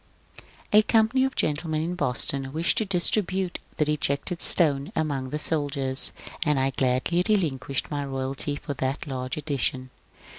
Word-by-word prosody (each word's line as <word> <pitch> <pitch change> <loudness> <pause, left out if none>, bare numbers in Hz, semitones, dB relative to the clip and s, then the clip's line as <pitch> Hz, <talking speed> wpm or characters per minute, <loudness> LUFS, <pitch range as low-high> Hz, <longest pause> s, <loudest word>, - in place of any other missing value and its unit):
A 210 - +8
company 225 +4 +3
of 265 - -3
gentlemen 155 +1 -1
in 170 +2 -2
Boston 135 -3 -1
wished 160 +4 +2
to 220 - 0
distribute 190 0 +2
'^ - - -33
The 150 - +2
Rejected 150 +3 -1
Stone 145 -5 +4
" - - -31
among 140 -4 -2
the 150 - -3
soldiers, 140 -4 -1 0.3
and 150 -4 +1
I 135 +1 +1
gladly 130 +7 +1
re 215 - +5
linquished 140 -6 -3
my 145 -1 -2
royalty 135 +1 -3
for 145 - -5
that 135 +2 -3
large 130 -2 -4
edition. 135 -3 -2
145 Hz, 160 wpm, -25 LUFS, 135-170 Hz, 0.3 s, A